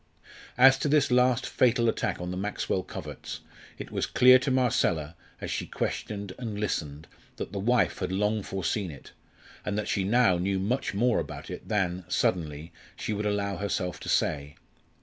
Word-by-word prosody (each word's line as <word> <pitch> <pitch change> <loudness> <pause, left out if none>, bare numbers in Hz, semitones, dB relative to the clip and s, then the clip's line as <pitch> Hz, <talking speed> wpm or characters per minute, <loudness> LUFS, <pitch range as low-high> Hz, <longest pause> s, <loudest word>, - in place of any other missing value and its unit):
As 135 +1 +7
to 150 - 0
this 145 -3 +3
last 125 -1 +3
fatal 120 -1 +2
attack 115 - 0
on 90 0 -4
the - - -3
Maxwell 95 -1 -2
coverts, - - -7 0.4
it - - -8
was - - -1
clear 130 +1 +7
to 130 - -2
Marcella, 110 - +1 0.2
as - - -5
she - - -2
questioned 100 -2 -4
and 110 -4 -4
listened, 75 -7 -3 0.3
that - - -6
the 100 - -4
wife 120 +4 +2
had 90 -1 -2
long 105 +3 +1
foreseen 95 0 -2
it, 70 -4 -11 0.5
and 105 0 -2
that 105 - -2
she 100 - 0
now 105 -3 +3
knew 95 +2 0
much 105 +2 -1
more 120 +3 +3
about - - -6
it - - -8
than 95 -4 0
suddenly 80 -3 -1 0.2
she 110 - -3
would 105 0 -1
allow 100 -1 -1
herself 95 -3 -2
to - - -7
say. 70 0 0
100 Hz, 175 wpm, -28 LUFS, 90-120 Hz, 0.5 s, As